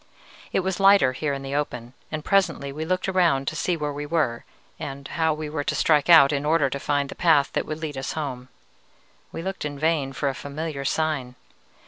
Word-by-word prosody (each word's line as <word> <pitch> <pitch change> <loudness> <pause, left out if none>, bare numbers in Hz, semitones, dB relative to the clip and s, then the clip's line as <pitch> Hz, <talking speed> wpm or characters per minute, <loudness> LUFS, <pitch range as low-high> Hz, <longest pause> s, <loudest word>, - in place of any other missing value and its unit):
"It - - +1
was 190 0 -2
lighter 195 -9 +6
here 145 +3 -2
in 135 -1 -4
the 135 0 -5
open, 125 -4 -3 0.2
and 155 -1 -4
presently 165 -8 +1
we 155 +3 -5
looked 185 +3 -1
around 170 -8 +2
to - - -2
see 175 +2 0
where 150 -2 -3
we 145 +1 -5
were, 145 -8 0 0.3
and 140 0 -6
how 160 -1 +1
we 155 0 -4
were 150 -1 -3
to - - -1
strike 150 0 +2
out 155 -5 +8
in 140 0 -1
order 150 -3 +2
to 140 - -3
find 145 0 0
the - - -6
path 155 -5 +3
that - - -1
would 155 0 -4
lead 145 -4 -4
us 135 - -4
home. 130 -5 -5 0.8
We 165 - -6
looked 190 +1 -4
in 145 -1 -4
vain 155 -2 0
for 140 - -2
a 135 - 0
familiar 140 +1 -5
sign. 145 -5 -1
150 Hz, 215 wpm, -24 LUFS, 140-165 Hz, 0.8 s, out